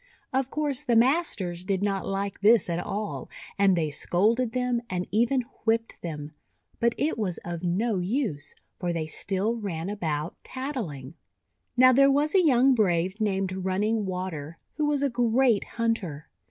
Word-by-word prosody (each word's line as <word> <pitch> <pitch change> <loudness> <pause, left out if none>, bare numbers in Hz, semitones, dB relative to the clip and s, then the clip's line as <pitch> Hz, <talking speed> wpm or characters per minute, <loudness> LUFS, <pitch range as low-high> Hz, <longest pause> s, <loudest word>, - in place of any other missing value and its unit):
Of 265 0 +1
course 290 -3 -1
the 240 - +1
masters 225 - +2
did 195 +1 -1
not 195 -2 -1
like 195 0 -3
this 215 -3 +5
at 170 - -1
all, 205 +3 -4 0.3
and 195 -2 +5
they 155 -3 0
scolded 220 - +1
them, 250 -1 0
and 180 0 -2
even 240 +5 +2 0.2
whipped 225 0 0
them. 150 -2 -6 0.5
But 235 0 +2
it 295 -5 0
was 185 -5 -1
of 170 -1 -4
no 190 +4 0
use, 185 - -2 0.2
for 175 -1 -1
they 165 -2 -2
still 195 +8 -2
ran 190 -4 -4
about 160 -6 -3
tattling. 215 - -5 0.6
Now, 255 +1 +8
there 275 +2 +6
was 290 +2 +2
a 380 -2 +5
young 265 -3 +5
brave 190 -2 +1
named 195 -3 0
Run 190 +1 0
ning 215 -1 0
Water, 170 -4 -5 0.2
who 300 -1 0
was 290 -1 +1
a 280 - +2
great 235 -1 +2
hunter. 205 -11 -2
205 Hz, 165 wpm, -27 LUFS, 175-245 Hz, 0.6 s, Now